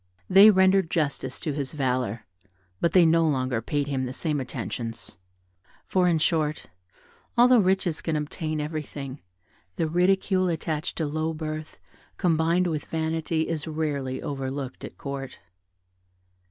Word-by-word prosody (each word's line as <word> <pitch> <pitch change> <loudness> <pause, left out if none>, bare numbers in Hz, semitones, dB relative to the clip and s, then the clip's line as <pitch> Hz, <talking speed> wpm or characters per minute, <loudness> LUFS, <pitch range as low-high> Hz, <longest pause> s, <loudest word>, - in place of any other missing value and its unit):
They 195 +3 +8
rendered 190 -3 +4
justice 140 -5 -2
to 150 - -2
his 140 0 -3
valour, 125 -6 -1 0.5
but 170 - +1
they 180 -2 +7
no 165 +1 +4
longer 130 -4 0
paid 145 +5 -1
him 135 -2 -2
the 130 - -6
same 150 -2 -1
attentions; 115 -3 -5 0.7
for 185 -1 +2
in 170 -2 +3
short, 155 -1 0 0.7
although 245 0 +7
riches 185 -4 +1
can 160 - -1
obtain 155 +1 -3
everything, 150 -3 -5 0.5
the 160 - 0
ridicule 185 +2 +2
attached 160 -1 -2
to 160 - -1
low 155 +2 -2
birth 155 0 -6 0.4
combined 170 0 +2
with 160 -4 -2
vanity 160 0 -1
is 165 -1 -3
rarely 145 -4 -2
overlooked 135 -1 -4
at - - -8
Court. 140 -1 -6
155 Hz, 135 wpm, -26 LUFS, 140-170 Hz, 0.7 s, They